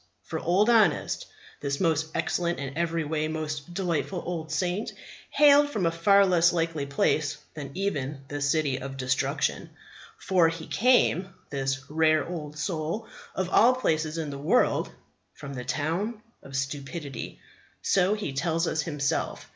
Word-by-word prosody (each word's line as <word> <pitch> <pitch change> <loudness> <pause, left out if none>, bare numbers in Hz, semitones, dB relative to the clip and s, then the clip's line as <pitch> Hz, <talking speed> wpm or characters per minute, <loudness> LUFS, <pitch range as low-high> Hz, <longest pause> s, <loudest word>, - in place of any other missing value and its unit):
For 160 - -4
Old 185 +7 +2
Honest, 230 -3 +3 0.3
this 140 -1 -2
most 160 -3 +1
excellent 175 -1 0
and 140 0 -5
every 165 0 0
way 155 0 -1
most 155 0 -4
delightful 180 -1 -1
old 165 -3 -4
saint, 185 +4 -1 0.4
hailed 290 0 +6
from 210 -10 -1
a 165 - +3
far 200 +4 +5
less 175 -2 +4
likely 165 -4 -1
place 145 +1 +1 0.2
than 145 -3 -6
even 150 -8 -2
the 145 0 -5
City 140 -2 +1
of 135 0 -6
Destruction. 130 0 -1 0.5
For 180 -4 +3
he 165 -1 -6
came, 195 -6 +2 0.2
this 135 -1 -1
rare 155 0 +2
old 155 -4 -6
soul, 170 +6 -3 0.3
of 190 -1 -1
all 250 +3 +6
places 155 -9 0
in 155 -3 -3
the 140 - -6
world, 195 - +2 0.5
from 140 -2 -8
the 125 -2 -5
Town 190 - -2 0.2
of 135 - -10
Stupidity. 140 +2 -4 0.4
So 195 +2 +3
he 205 -10 -4
tells 165 +4 0
us 160 -1 0
himself. 145 -4 -2
160 Hz, 150 wpm, -27 LUFS, 145-180 Hz, 0.5 s, hailed